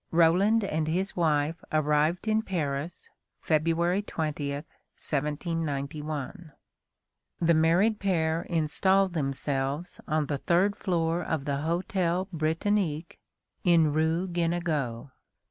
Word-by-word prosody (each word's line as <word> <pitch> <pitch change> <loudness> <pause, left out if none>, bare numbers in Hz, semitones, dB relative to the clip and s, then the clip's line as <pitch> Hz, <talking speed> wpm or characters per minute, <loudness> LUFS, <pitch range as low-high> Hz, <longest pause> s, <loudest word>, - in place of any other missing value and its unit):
Roland 180 +7 +4
and 160 -5 -1
his 185 +4 -1
wife 155 -1 +1
arrived 155 +5 +1
in 220 0 +2
Paris, 160 -5 -3 0.3
February 165 +4 +1
20, 155 -7 -3
1791. 150 +1 -3 0.9
The 170 0 +3
married 175 +7 +3
pair 165 -4 +1
installed 185 +4 +2
themselves 140 +1 -2
on 155 -1 +1
the 145 -1 -3
third 185 +6 +2
floor 170 -2 0
of 155 -4 -2
the 140 -1 -1
hotel 175 +3 -1
Britannique, 165 +1 -1 0.4
in 165 -4 +4
rue 160 +4 +1
Guénégaud. 165 -8 -2
165 Hz, 100 wpm, -28 LUFS, 150-175 Hz, 0.9 s, Roland